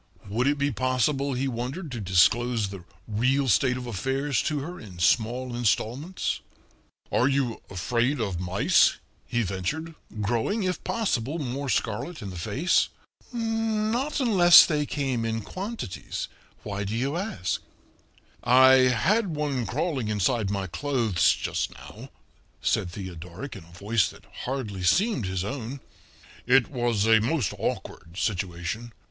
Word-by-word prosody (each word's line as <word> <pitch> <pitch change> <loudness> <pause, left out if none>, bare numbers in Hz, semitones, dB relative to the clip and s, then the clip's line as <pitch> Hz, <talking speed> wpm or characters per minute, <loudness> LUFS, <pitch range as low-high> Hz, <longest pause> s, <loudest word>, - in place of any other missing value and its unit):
Would 115 +6 0
it 145 +1 +2
be 140 +1 +1
possible, 135 +2 0
he 130 +2 -1
wondered 130 +7 -4
to 120 - -4
disclose 105 +4 +3
the 95 -3 -8 0.2
real 130 +6 +1
state 125 +4 +3
of 125 - -6
affairs 130 +4 -1
to 155 - -1
her 175 +5 -7
in 95 -5 -11
small 120 +8 +1
installments? 120 - -1 0.7
"Are 125 - +3
you 135 -4 0
afraid 120 - 0
of 100 -6 -2
mice?" 90 +2 +3 0.3
he 120 -1 0
ventured, 110 - -3 0.3
growing, 120 - 0
if 180 -2 -2
possible, 155 - -1
more 140 -1 -3
scarlet 120 +7 -2
in 100 - -5
the - - -9
face. 135 - +1 0.4
"Not 225 +3 -1
unless 190 -9 +8
they 150 -3 0
came 135 -5 -1
in 115 0 -1
quantities. 185 - -5 0.4
Why 100 0 -3
do 100 +2 -3
you 135 +6 -1
ask?" 170 - -2 0.8
"I 130 +1 +7
had 175 - +1
one 140 -6 -1
crawling 135 - -1
inside 105 0 +1
my 100 -1 -1
clothes 115 -2 +1
just - - -2
now," - - -11 0.5
said 90 - 0
Theodoric 90 - -7
in - - -10
a 85 - -18
voice 105 0 +1
that - - -15 0.2
hardly 120 -7 -3
seemed 130 - +2
his 95 -1 -2
own. 130 +3 -5 0.7
"It 125 0 +5
was 120 -5 +1
a 110 -1 +5
most 125 - 0
awkward 85 +2 -4
situation." 95 +3 -3
125 Hz, 140 wpm, -26 LUFS, 105-145 Hz, 0.8 s, unless